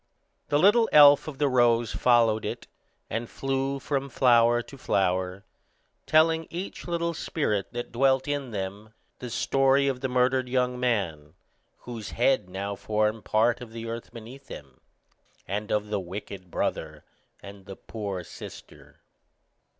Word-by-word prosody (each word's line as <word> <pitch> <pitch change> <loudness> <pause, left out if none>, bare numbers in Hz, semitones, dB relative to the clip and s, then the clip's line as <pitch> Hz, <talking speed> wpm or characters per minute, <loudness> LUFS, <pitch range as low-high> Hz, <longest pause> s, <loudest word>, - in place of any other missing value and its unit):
The 145 - +3
little 210 +8 +5
elf 145 -1 +7
of 150 -3 -6
the 145 - +2
rose 120 -3 +3
followed 115 -3 +3
it, - - -5 0.4
and 115 +2 -4
flew 135 0 -2
from 140 0 -3
flower 120 -2 +4
to 140 - -13
flower, 95 -4 -1 0.6
telling 160 +1 +3
each 180 +2 -6
little 170 -1 -1
spirit 110 -11 -2
that 120 0 -5
dwelt 130 +2 +2
in 145 -2 -2
them 105 +1 -6 0.2
the 125 - -6
story 135 +3 +2
of 130 -2 -2
the 135 - 0
murdered 125 0 +1
young 125 -1 0
man, 85 -11 -2 0.5
whose 115 -5 -7
head 120 -5 +1
now 100 +2 -4
formed 105 +2 -1
part 115 +3 +2
of 115 -2 -10
the 115 0 -6
earth 115 0 -6
beneath 120 +4 -11
them, 70 -3 -11 0.7
and 105 +2 -3
of 105 0 0
the 105 -1 -1
wicked 95 0 -8
brother - - -3 0.4
and 100 -1 -12
the 95 - -8
poor 100 -5 -6
sister. - - -12
120 Hz, 145 wpm, -26 LUFS, 105-135 Hz, 0.7 s, elf